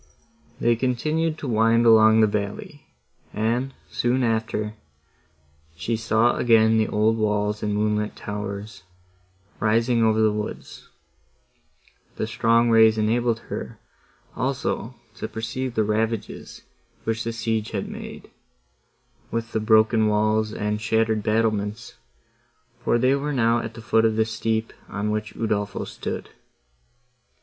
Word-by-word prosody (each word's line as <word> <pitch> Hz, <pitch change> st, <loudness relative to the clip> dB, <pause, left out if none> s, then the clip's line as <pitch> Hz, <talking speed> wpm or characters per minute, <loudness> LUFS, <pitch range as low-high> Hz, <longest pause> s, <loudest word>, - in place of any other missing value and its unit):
They 120 Hz, 0 st, +3 dB
continued 155 Hz, +7 st, -1 dB
to 145 Hz, -, -6 dB
wind 115 Hz, 0 st, +3 dB
along 110 Hz, -1 st, +6 dB
the -, -, +6 dB
valley, 105 Hz, +8 st, -4 dB, 0.5 s
and, 120 Hz, +5 st, 0 dB, 0.2 s
soon 125 Hz, +2 st, +1 dB
after, 110 Hz, -2 st, -1 dB, 1.0 s
she 115 Hz, +7 st, -2 dB
saw 115 Hz, +1 st, +2 dB
again 110 Hz, -1 st, +4 dB
the 110 Hz, -, +2 dB
old 110 Hz, +2 st, +1 dB
walls 105 Hz, -1 st, 0 dB
and 105 Hz, -1 st, -1 dB
moonlit 105 Hz, 0 st, 0 dB
towers, 105 Hz, 0 st, -6 dB, 0.8 s
rising 115 Hz, +2 st, +2 dB
over 110 Hz, 0 st, +3 dB
the 110 Hz, -1 st, +4 dB
woods: 105 Hz, 0 st, -6 dB, 1.3 s
the -, -, -2 dB
strong 115 Hz, +1 st, +2 dB
rays 110 Hz, -1 st, +6 dB
enabled 115 Hz, +1 st, +1 dB
her, -, -, -5 dB, 0.6 s
also, -, -, -2 dB, 0.2 s
to -, -, -4 dB
perceive 120 Hz, +3 st, -4 dB
the 110 Hz, -, +2 dB
ravages, 110 Hz, +1 st, -3 dB, 0.4 s
which 115 Hz, 0 st, -2 dB
the 115 Hz, -, -2 dB
siege 110 Hz, -1 st, -2 dB
had 100 Hz, -3 st, -3 dB
made,—with 65 Hz, -, -10 dB
the 110 Hz, -, 0 dB
broken 110 Hz, 0 st, +4 dB
walls, 110 Hz, +1 st, +1 dB
and 105 Hz, 0 st, -2 dB
shattered 110 Hz, 0 st, +1 dB
battlements, 110 Hz, 0 st, -1 dB, 0.9 s
for -, -, +2 dB
they 130 Hz, +3 st, +3 dB
were 145 Hz, +1 st, -1 dB
now 115 Hz, -2 st, +2 dB
at 115 Hz, -1 st, -6 dB
the 115 Hz, -, -10 dB
foot 110 Hz, 0 st, +3 dB
of 110 Hz, -1 st, +2 dB
the 110 Hz, 0 st, +2 dB
steep, 110 Hz, 0 st, -2 dB, 0.2 s
on 105 Hz, +1 st, -2 dB
which 110 Hz, 0 st, -3 dB
Udolpho 105 Hz, -2 st, -2 dB
stood. -, -, -6 dB
110 Hz, 125 wpm, -24 LUFS, 105-115 Hz, 1.3 s, along